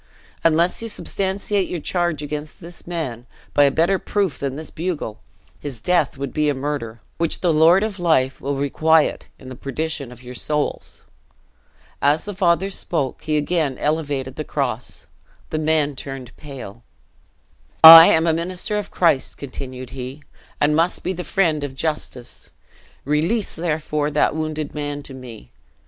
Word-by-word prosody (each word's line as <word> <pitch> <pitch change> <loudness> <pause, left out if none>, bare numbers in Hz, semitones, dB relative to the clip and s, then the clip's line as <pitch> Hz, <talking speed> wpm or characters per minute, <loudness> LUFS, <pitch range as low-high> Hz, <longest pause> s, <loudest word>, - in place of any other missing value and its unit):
Unless 165 +4 +3
you 230 - -4
substantiate 195 -1 -1
your 175 - -3
charge 175 -2 -1
against 150 +1 -6
this 175 +1 -11
man, 130 -9 -4 0.3
by 145 - +5
a - - +5
better 170 +7 +2
proof 195 -9 -1
than 135 -1 -3
this 155 +1 -7
bugle, 160 -10 -4 0.4
his 135 -5 -6
death 160 +1 +1
would 140 -1 -5
be 150 -1 +1
a 145 - 0
murder, 130 -5 -4 0.2
which 165 -1 0
the 175 -3 +2
Lord 165 +6 +5
of 210 -3 -3
life 145 -7 +1
will 140 +1 -2
requite 155 +3 +2
in 130 - -13
the 130 - -8
perdition 140 0 -4
of 125 0 -13
your 125 0 -9
souls." 150 +4 -3 1.0
As 145 +3 +2
the 205 - -5
father 185 0 +1
spoke, 150 -8 -2
he 155 -1 0
again 150 -3 0
elevated 145 -4 -2
the 155 - -3
cross: 125 -6 -4 0.5
the 155 - -1
men 155 -2 +1
turned 135 -2 -8
pale. 130 -7 -10 1.0
"I 165 +1 +13
am 160 +1 +4
a 165 - +3
minister 185 +5 -1
of 205 - -6
Christ," 165 -7 +1
continued 130 -2 -7
he, 135 +2 -7 0.4
"and 150 +1 +3
must 165 +3 +1
be 185 - -1
the 180 0 -5
friend 165 -7 +1
of 135 -2 -5
justice. 135 -4 -4 0.6
Release, 165 - 0
therefore, 150 -3 -1
that 150 - +1
wounded 155 -1 -3
man 145 -1 -4
to 135 - -9
me. 120 - -11
150 Hz, 160 wpm, -21 LUFS, 135-170 Hz, 1.0 s, I